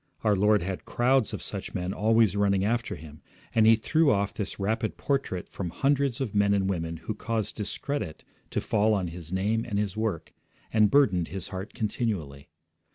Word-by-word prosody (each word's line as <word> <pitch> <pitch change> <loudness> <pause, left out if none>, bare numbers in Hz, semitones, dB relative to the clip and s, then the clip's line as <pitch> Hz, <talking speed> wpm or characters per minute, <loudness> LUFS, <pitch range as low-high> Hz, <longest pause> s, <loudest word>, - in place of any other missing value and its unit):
Our 105 -2 +4
Lord 105 0 +3
had 95 +1 -4
crowds 125 -1 +2
of - - -5
such - - -6
men 90 +1 -2
always 110 -1 +3
running 100 -1 +2
after 115 +2 -1
Him, 75 0 -12 0.3
and 110 -1 +5
He 115 - +8
threw 155 +8 +2
off 100 0 +1
this 105 - -5
rapid 110 +2 -1
portrait 135 -11 -1
from 90 -3 -5
hundreds 140 - +1
of 130 -7 -2
men 100 0 +3
and 95 -1 +1
women 85 -3 -2
who 85 +7 -4
caused 110 -1 -3
discredit 110 - -4 0.3
to - - -1
fall 110 0 +2
on 95 -4 -1
His 85 -1 -9
name 105 +4 0
and 105 -4 -3
His 100 -2 -1
work, 110 -7 -2 0.4
and 105 -2 +5
burdened 95 - +3
His 95 -1 -5
heart 95 +4 -6
continually. 95 - -3
105 Hz, 185 wpm, -27 LUFS, 95-115 Hz, 0.4 s, He